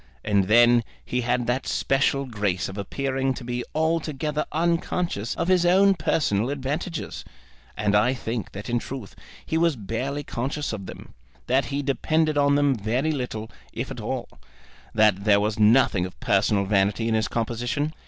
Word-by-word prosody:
And 100 -2 +2
then 120 +3 +5 0.2
he 125 - -1
had 125 0 0
that 125 +3 -1
special 135 0 +1
grace 105 -6 -1
of 95 - -8
appearing 135 +6 -2
to - - -8
be 120 0 -3
altogether 155 -2 -1
unconscious 165 - -1
of 170 - -2
his 185 -1 +4
own 190 +3 +5
personal 120 - 0
advantages. 145 +5 -4 0.5
And 105 -1 +1
I 120 +6 +3
think 115 -2 -4
that 100 +1 -7
in 120 -1 0
truth 125 -5 -8 0.3
he 160 - 0
was 165 -3 +3
barely 125 +7 -3
conscious 140 +2 -3
of 100 -4 -6
them; - - -10 0.3
that 130 +1 +2
he 140 +4 -3
depended 155 +3 +1
on 140 0 +3
them 145 -1 +3
very 125 +7 -1
little, 120 -6 -4 0.2
if - - -4
at - - -6
all; - - -3 0.7
that 105 -3 +4
there 100 -1 +5
was 105 +1 -1
nothing 105 -4 +4
of 90 - -16
personal 100 0 +2
vanity 100 +3 +1
in 115 - +1
his 110 0 +1
composition. 120 +6 -2
125 Hz, 165 wpm, -25 LUFS, 110-145 Hz, 0.7 s, then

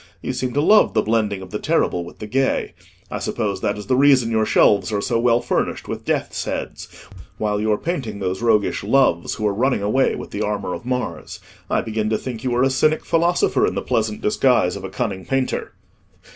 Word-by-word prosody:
You - - -2
seem 125 0 -2
to 145 - +1
love 210 - +5
the 110 - +3
blending 105 -3 0
of 90 - -12
the - - -3
terrible 90 - 0
with 85 - -12
the 105 - -7
gay. 135 +5 0 0.4
I - - -3
suppose 100 -3 -2
that 100 - -1
is 105 - -7
the 130 - +1
reason 130 -3 +4
your 110 -1 +1
shelves 100 -2 +3
are 105 - 0
so 115 - 0
well 120 0 +3
furnished - - -2
with - - -6
death's - - -1
heads, - - -5 0.5
while 105 -1 -1
you 110 0 +1
are 105 - +2
painting 130 - -4
those 95 0 -3
roguish 110 -5 +1
Loves 105 -6 +2
who 110 - -3
are 105 - +2
running 125 0 0
away 130 +6 +2
with - - -8
the 105 - -4
armour 105 -3 -2
of 120 - -7
Mars. 125 -10 -4 0.3
I - - +1
begin 110 -1 -2
to 110 - +1
think 120 -2 -6
you 125 -2 0
are 125 - +3
a 135 - +3
Cynic 155 +4 +1
philosopher 170 +2 +2
in - - -3
the - - -2
pleasant 110 -1 -1
disguise 115 -3 +2
of 100 - -7
a 95 - -5
cunning 95 -1 -3
painter." 135 +3 -2
110 Hz, 220 wpm, -21 LUFS, 105-130 Hz, 0.5 s, love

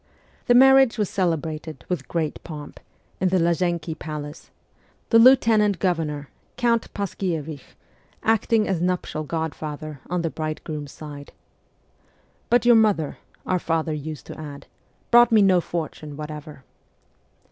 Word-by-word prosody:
The 245 - +5
marriage 265 -1 +6
was 210 -3 -1
celebrated 160 -5 -2
with 175 -7 -3
great 160 -3 -3
pomp, 150 -3 -9 0.4
in 185 - +2
the 185 - +2
Lazienki 170 -1 0
palace; 150 -1 -7 0.6
the 230 - +7
lieutenant 225 -5 +5
governor, 155 -5 -1 0.3
Count 235 -2 +1
Paskiewich, 165 -7 -4 0.5
acting 225 0 +2
as 185 -4 -1
nuptial 180 -3 -1
godfather 155 -2 -5
on 175 0 -1
the 165 - -1
bride 155 -1 -4
groom's 150 -3 -6
side. 145 -2 -10 0.6
' - - -38
But 240 0 +3
your 240 -1 +7
mother,' 205 -9 +1 0.3
our 185 - +1
father 160 -1 -1
used 150 0 -6
to - - -9
add, 145 -2 -8 0.2
' - - -40
brought 240 0 +7
me 215 -2 +6
no 185 -2 +4
fortune 155 -3 -5
whatever.' 150 -2 -8
165 Hz, 135 wpm, -23 LUFS, 155-200 Hz, 0.6 s, the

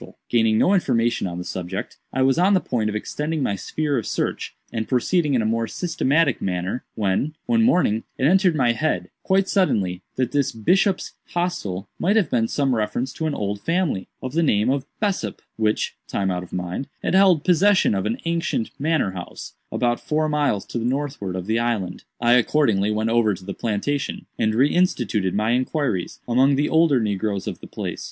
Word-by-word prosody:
Gaining 115 -2 +3
no 190 - +4
information 120 - +1
on 85 -1 -5
the 90 - -4
subject, 90 +2 -5
I 130 - +1
was 135 +3 +3
on 195 +3 +4
the - - +4
point 110 -10 -1
of 105 - -4
extending 150 +7 -2
my 100 - 0
sphere 145 +6 -1
of 110 - -6
search, - - -2 0.2
and 110 -1 -2
proceeding 145 +3 +1
in 115 - +2
a - - -2
more 115 +1 0
systematic 155 -3 +1
manner, 90 +5 -2
when, 110 +9 0
one 230 -1 +2
morning, 180 - +3
it - - -3
entered 180 +1 +4
into - - -1
my 125 -4 +3
head, 155 +6 -1
quite 190 0 +2
suddenly, 100 - +1
that 130 -2 0
this 140 -2 +1
'Bishop's 185 - +1 0.2
Hostel' 105 - -2
might 200 +4 +2
have 125 - +2
some 140 -3 +1
reference 120 +3 -1
to 160 - -2
an 155 - -2
old 100 0 -3
family, 165 - -1
of 130 0 -4
the 165 - +2
name 115 -6 +2
of 135 0 -2
Bessop, 205 -3 -1 0.2
which, 110 -1 0
time 95 -1 -1
out 90 0 -2
of 90 - -11
mind, 90 +8 -4 0.2
had - - 0
held 190 -5 +5
possession 185 - +4
of 95 +1 -1
an 115 - -1
ancient 165 -9 -1
manor 155 -8 +1
house, 90 -1 -8 0.2
about 120 -1 0
four 155 0 0
miles 145 -9 0
to - - -4
the - - -3
northward 130 -8 -2
of 90 -1 -4
the 110 +3 +1
island. 110 -7 -2
I 120 0 +4
accordingly 115 -5 +3
went 110 +1 0
over 115 -3 +3
to 95 - -13
the 100 - -4
plantation, 120 +8 -2
and 110 -1 +1
re 135 +5 +3
instituted 115 - +1
my 110 +2 +1
inquiries 125 - -1
among 130 +3 +4
the 145 +2 +1
older 160 -5 +4
negroes 100 -2 -1
of - - -5
the - - -11
place. - - -5
125 Hz, 195 wpm, -23 LUFS, 105-155 Hz, 0.2 s, held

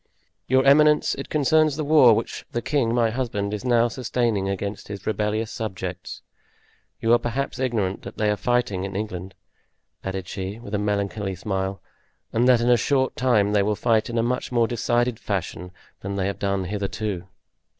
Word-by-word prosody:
"Your 130 +1 +3
eminence, 150 +2 +5
it 135 - -6
concerns 155 0 +3
the 155 - -2
war 145 -6 +6
which 115 - -3
the 120 - -1
king, 135 -6 +1
my 115 -1 +2
husband, 105 -5 -2
is 105 - -4
now 120 -2 +3
sustaining 115 -4 -1
against 100 +1 -4
his 100 -1 -7
rebellious 110 +1 -1
subjects. 95 -4 -5 0.8
You 115 +1 +3
are 120 - +5
perhaps 125 +1 -3
ignorant 110 -7 -1
that 100 - -10
they 105 -1 +2
are - - +1
fighting 120 -5 0
in 95 0 -5
England," 95 -3 -5 0.7
added 95 -1 -4
she, 95 +2 -5
with 115 -3 -10
a 105 - +1
melancholy 100 -1 -1
smile, 95 +1 -3 0.5
"and 120 +2 +3
that 125 -2 +5
in 120 - +2
a 120 - +6
short 130 0 +1
time 110 -5 +2
they 105 - +4
will 105 +1 +1
fight 110 0 +1
in 120 - -3
a 115 - +2
much 125 +2 -2
more 120 -2 +3
decided 120 0 0
fashion 90 -3 -4 0.3
than 100 +1 -5
they 95 -1 -1
have 100 0 -3
done 100 -1 0
hitherto." 100 -1 -3
110 Hz, 180 wpm, -24 LUFS, 100-120 Hz, 0.8 s, war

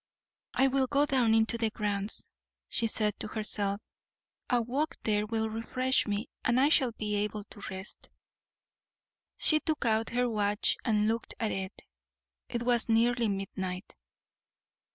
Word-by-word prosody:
"I 270 - +5
will 265 0 +2
go 285 +2 +3
down 250 -5 +3
into 225 +1 +3
the 225 -1 +2
grounds," 205 -1 0 0.4
she 230 - +3
said 215 -1 +1
to - - -2
herself; 210 -2 -1 0.7
"a 245 - +3
walk 265 +7 -1
there 210 -1 +1
will 220 0 0
refresh 255 +4 0
me, 205 +2 -1 0.2
and 240 +1 +3
I 280 +3 +5
shall 265 -6 +3
be 210 -1 -3
able 210 0 -2
to 205 - -13
rest." 190 +1 -7 1.3
She 310 - +3
took 310 -4 -2
out 225 0 +2
her 245 +1 +1
watch 210 -2 +1
and 215 -3 +2
looked 225 +1 -2
at 220 -2 0
it; 190 +1 -5 0.7
it 235 -1 -2
was 240 -1 +2
nearly 230 0 +3
midnight. 190 -1 -4
225 Hz, 150 wpm, -30 LUFS, 210-245 Hz, 1.3 s, I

